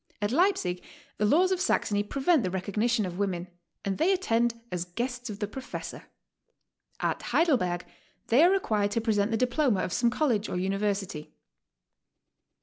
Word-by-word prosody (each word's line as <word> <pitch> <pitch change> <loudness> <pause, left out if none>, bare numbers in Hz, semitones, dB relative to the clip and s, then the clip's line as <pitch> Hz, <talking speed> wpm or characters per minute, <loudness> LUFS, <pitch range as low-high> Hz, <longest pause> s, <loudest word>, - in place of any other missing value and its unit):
At 205 +1 -1
Leipsic 275 - +1 0.4
the 210 - +2
laws 360 - +4
of 370 -1 0
Saxony 205 - +1
pre\^ent 275 +8 +2
the 185 - -1
recognition 210 +5 0
of 180 0 -6
women, 185 -3 -1 0.4
and 195 -1 -2
they 340 +5 +4
attend 235 -11 +1
as 180 -1 -2
guests 245 +7 -4
of 205 - -5
the 205 - -2
professor. 260 +5 -7 0.9
At - - -1
Heiidelberg 225 - +1 0.5
they 250 +7 +6
are 350 - +7
required 215 - +1
to 230 - 0
present 215 -2 +1
the 225 - 0
diploma 250 -4 +1
of 180 - -3
some 235 - +3
college 235 -5 0
or - - -2
uni 195 +2 -1
versity. 195 -7 -3
220 Hz, 160 wpm, -28 LUFS, 195-265 Hz, 0.9 s, are